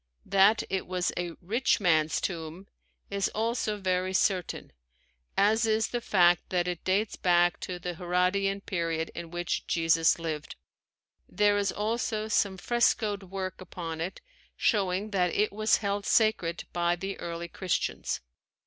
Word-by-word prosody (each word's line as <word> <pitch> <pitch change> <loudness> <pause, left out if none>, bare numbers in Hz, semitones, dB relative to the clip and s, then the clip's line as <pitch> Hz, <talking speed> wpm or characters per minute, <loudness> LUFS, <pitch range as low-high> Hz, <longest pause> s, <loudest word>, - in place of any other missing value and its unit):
That 200 +2 +4
it 190 0 -2
was 180 0 -1
a 175 -1 -3
"rich 230 +10 +1
man's 160 -5 +2
tomb" 170 +1 -5 0.5
is 200 -1 0
also 220 -1 -1
very 185 -1 -1
certain, 185 -3 0 0.7
as 220 +3 +3
is 220 0 +1
the 240 - -2
fact 175 -5 +3
that 180 -1 0
it 175 -2 -3
dates 200 +3 +1
back 175 -1 +3
to 180 - -5
the 175 0 -4
Herodian 180 +3 0
period 165 -4 -2
in 170 - -7
which 175 0 -3
Jesus 165 -1 +3
lived. 160 -3 -5 0.7
There 205 0 +3
is 200 -1 +1
also 215 0 -2
some 200 -2 +1
frescoed 215 -1 +1
work 190 -1 -5
upon 165 -3 -6
it 180 +4 -4 0.4
showing 200 0 +1
that 180 -3 +1
it 210 0 +1
was 215 +1 +3
held 200 0 -1
sacred 200 -7 +2
by 175 0 +1
the 195 +3 -5
early 170 0 -5
Christians. 180 +1 -2
185 Hz, 145 wpm, -28 LUFS, 175-205 Hz, 0.7 s, That